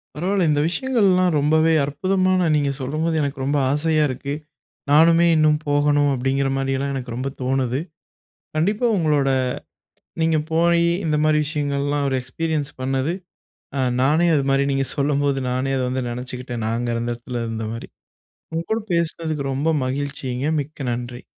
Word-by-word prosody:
பரவாயில்ல. 180 +3 +1
இந்த 145 -1 +2
விஷயங்கள்லாம், 195 -5 +2
ரொம்பவே 155 +3 +3
அற்புதமான, 185 +5 +1
நீங்க 145 -2 +1
சொல்லும்போது 155 +5 -1
எனக்கு 140 -2 -3
ரொம்ப 145 +2 +1
ஆசையா 155 +1 +2
இருக்கு. 140 +2 -4 0.6
நானுமே 165 +3 +6
இன்னும் 155 -1 +4
போகணும் 145 0 +3
அப்பிடிங்கிற 135 +1 0
மாரியெல்லாம் 135 +1 -1
எனக்கு 125 -3 -5
ரொம்ப 130 +2 -2
தோணுது. 130 -1 0 0.8
கண்டிப்பா 205 +9 +1
உங்களோட 150 -4 +2 0.9
நீங்க 160 -1 +2
போயி, 170 +1 +3 0.2
இந்த 155 -1 +1
மாதிரி 155 0 +3
விஷயங்கள்லாம், 145 -1 -1
1 135 - 0
எக்ஸ்பீரியன்ஸ் 150 +3 -2
பண்ணது, 135 +4 0 0.6
அ - - 0 0.2
நானே 155 +6 +3
அது 140 - +1
மாதிரி 135 0 +3
நீங்க 135 0 0
சொல்லும்போது, 140 -1 +1
நானே 130 +2 -1
அத 130 - 0
வந்து 130 +1 -2
நினைச்சுக்கிட்டேன். 125 -1 -5
நான் 110 +1 0
அங்க 120 0 -2
அந்த 120 +1 -2
இடத்துல 120 0 -5
இருந்தமாரி. 115 0 -5 0.6
உங்க 165 +1 -2
கூட 220 - +1
பேசுனதுக்கு 160 -3 -1
ரொம்ப 140 +4 -1 0.2
மகிழ்ச்சிங்க. 135 -1 -3 0.2
மிக்க 140 -2 -7
நன்றி. 120 +1 -6
145 Hz, 145 wpm, -22 LUFS, 130-160 Hz, 0.9 s, நானுமே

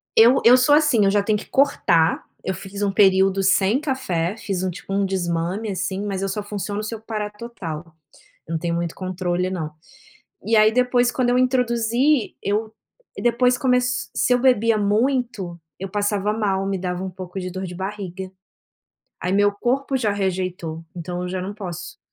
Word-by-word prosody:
Eu 240 +4 +6
eu 250 +2 +9
sou 255 +4 +4
assim, 295 -9 +4
eu 195 - +4
já 205 0 +3
tenho 215 0 +1
que - - -10
cortar, 175 - +3 0.2
eu 190 - -1
fiz 195 +3 -8
um 200 -1 +1
período 195 -1 +4
sem 195 +5 +3
café, 210 - -1
fiz 195 -4 -3
um, 185 - 0
tipo, 190 +2 -7
um 200 0 +2
desmame, 185 +3 -2
assim, 190 +1 -2
mas 195 -2 -3
eu 195 - -1
só 210 +1 -2
funciono 205 0 -4
se 215 - -4
eu 220 - -11
parar 215 -2 -4
total, 205 -8 -7 0.6
eu 165 - -7
não 165 - 0
tenho 170 +1 -2
muito 170 -1 -2
controle 185 -1 -2
não. 160 -5 -4 0.7
E 220 +2 +2
aí 215 0 +6
depois, 250 0 +3
quando 245 -1 0
eu 250 - +3
introduzi, 250 +1 +2
eu 215 +2 -1 0.5
depois 245 +1 +3
começ 250 -1 +1
se 255 - +2
eu - - +3
bebia 230 -3 +4
muito, 210 -4 0 0.2
eu 195 +1 -5
passava 205 0 0
mal, 195 -3 0
me 195 -1 -1
dava 180 0 -3
um 190 - -4
pouco 185 0 -8
de 185 0 -4
dor 185 +1 -5
de 180 -1 -6
barriga. 190 -1 -5 0.9
Aí 180 - -1
meu 205 +1 +4
corpo 265 +6 -1
já 220 -5 0
rejeitou, 185 -4 -3
então 175 +1 -5
eu 180 - -3
já 185 +1 -3
não 195 +2 -5
posso 185 -6 -7
200 Hz, 185 wpm, -22 LUFS, 185-235 Hz, 0.9 s, eu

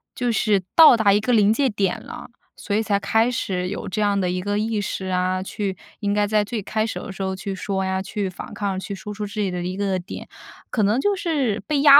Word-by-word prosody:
就 245 -1 0
是 210 -4 +2
到 315 -7 +9
达 205 -2 +4
一 205 - +4
个 245 +4 -1
临 210 -2 +5
界 270 +2 +2
点 195 -4 -1
了。 - - -9 0.3
所 205 - -3
以 220 - +2
才 200 -2 +1
开 225 +4 +2
始 180 -6 -2
有 205 +1 -4
这 190 - -3
样 205 -1 +2
的 180 -1 0
一 180 - -1
个 205 +2 -1
意 220 -1 0
识 190 -1 -3
啊， 185 0 0
去 195 0 -3 0.3
应 205 -1 0
该 205 0 +2
在 210 0 +2
最 215 +1 -3
开始 215 +2 -2
的 - - -6
时 190 0 -5
候 190 0 -1
去 195 +1 -4
说 190 -1 -2
呀、 190 0 0
去 195 0 -3
反 180 - -9
抗、 195 -2 -2
去 200 - -5
说 210 +2 -7
出 210 0 -4
自己 205 -1 -2
的 180 -1 -3
一 180 +1 -3
个 195 -1 0
点。 175 - -8 0.4
可 215 - +1
能 215 +6 +3
就 410 +4 +2
是 290 - 0
被 295 -2 +1
压 285 -1 +10
205 Hz, 275 characters per minute, -23 LUFS, 190-220 Hz, 0.4 s, 压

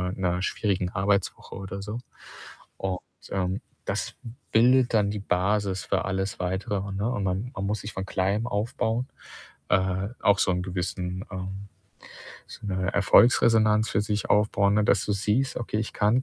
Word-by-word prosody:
äh, - - -12
'ner 90 -1 0
schwierigen 95 -4 0
Arbeitswoche, 100 0 -1
oder 100 0 -6
so. 105 +3 -5 0.8
Und, 95 -1 -2 0.3
ähm, 95 0 -1 0.2
das - - -3 0.4
bildet 125 +2 +5
dann 105 -2 +3
die 105 - -3
Basis 95 0 0
für - - 0
alles 95 0 -2
Weitere, 95 +2 -2
ne, 105 +4 -1
und 105 -6 -2
man 95 +7 -2
man 95 -1 -3
muss 105 0 -1
sich 105 - -7
vom 95 0 -4
Kleinem 100 +4 0
aufbauen, 115 +3 -1 0.6
äh, 95 +1 +1
auch 100 -1 +4
so 95 - +3
'n 90 0 0
Gewissen, 90 0 -3
ähm 95 +2 -6 0.8
so - - -9
'ne 95 0 -1
Erfolgsresonanz, 110 +1 +5
für 100 - +2
sich 105 0 -2
aufbauen, 100 -1 +3
ne, 105 - +3
dass - - +3
du 105 - 0
siehst: 110 +7 0
„Okay, 115 -2 -2
ich 110 - -3
kann 110 +5 +3
100 Hz, 165 wpm, -26 LUFS, 95-105 Hz, 0.8 s, bildet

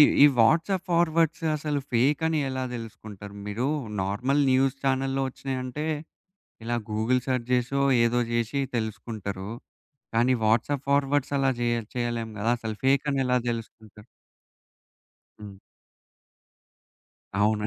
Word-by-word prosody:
ఈ - - +11 0.2
ఈ - - +11
WhatsApp 165 - +3
forwards 165 -1 +2
అసలు 150 -1 -2
ఫేక్ 135 +6 +3
అని 160 -1 +1
ఎలా 130 0 -2
తెలుసుకుంటారు? 105 -3 -9
మీరు 115 +6 -2 0.4
నార్మల్ 125 +9 +1
న్యూస్ 135 +1 +3
ఛానెల్లో 135 0 +1
వచ్చినయంటే, 130 +3 -4 0.8
ఇలా 120 +1 -1
గూగుల్ 110 +4 +1
సెర్చ్ 125 -2 -1
జేసో 125 +3 +1 0.2
ఏదో 120 +1 +2
జేషి 120 +4 0
తెలుసుకుంటారు. 105 -3 -4 0.7
కానీ 125 +3 +4
వాట్సాప్ 125 +6 +1
ఫార్వర్డ్స్ 140 0 +2
అలా 135 0 +3
జేయ 120 0 +2 0.2
చేయలేం 120 -2 -2
గదా! 115 +3 +1
అసలు 110 -2 -5
ఫేక్ 140 +2 +3
అని 135 - 0
ఎలా 125 0 +3
తెలుసుకుంటారు? 110 -2 -7 1.4
హ్మ్. 100 -2 -9 1.9
అవును. 105 0 +2
125 Hz, 120 wpm, -26 LUFS, 110-140 Hz, 1.9 s, ఈ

